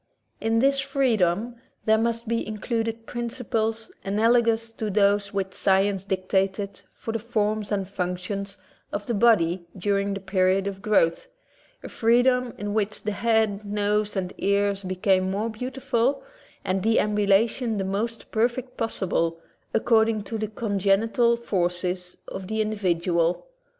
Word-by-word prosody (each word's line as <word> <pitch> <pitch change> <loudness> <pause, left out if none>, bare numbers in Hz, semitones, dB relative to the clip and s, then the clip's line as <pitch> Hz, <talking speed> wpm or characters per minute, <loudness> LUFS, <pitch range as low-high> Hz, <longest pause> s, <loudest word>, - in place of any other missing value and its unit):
In 225 0 +1
this 275 +3 +3
freedom 240 -6 +1 0.3
there 220 0 +4
must 230 0 -1
be 230 +1 -1
included 225 +1 -3
principles 230 -2 -2
analogous 230 +2 +2
to 220 -1 -3
those 200 0 +2
which 190 -1 -2
science 195 0 +2
dictated 190 +1 -1
for 225 - -5
the 225 - -2
forms 215 -2 -1
and 195 -2 -1
functions 195 +1 -4 0.3
of 205 0 -4
the 235 - -1
body 190 -6 +3
during 200 +1 0
the - - -4
period 190 0 +1
of 195 -1 -4
growth, 205 - +2 0.6
a - - -6
freedom 245 +2 +2
in 205 0 -3
which 210 -1 -1
the 210 - -1
head, 220 -1 +1
nose, 210 +1 0
and 185 -2 -2
ears 200 0 +1
became 185 0 +1
more 210 +4 -1
beautiful 255 +2 -1 0.4
and 185 +1 0
deambulation 210 +2 +2
the 195 - -1
most 215 +4 -3
perfect 240 +3 -1
possible, 170 -7 -1 0.3
according 220 -2 +2
to 220 +3 -4
the 215 - -1
congenital 215 +2 +1
forces 180 -4 -2
of 190 -1 -6
the 220 +2 -2
individual. 180 - 0
210 Hz, 135 wpm, -25 LUFS, 195-230 Hz, 0.6 s, there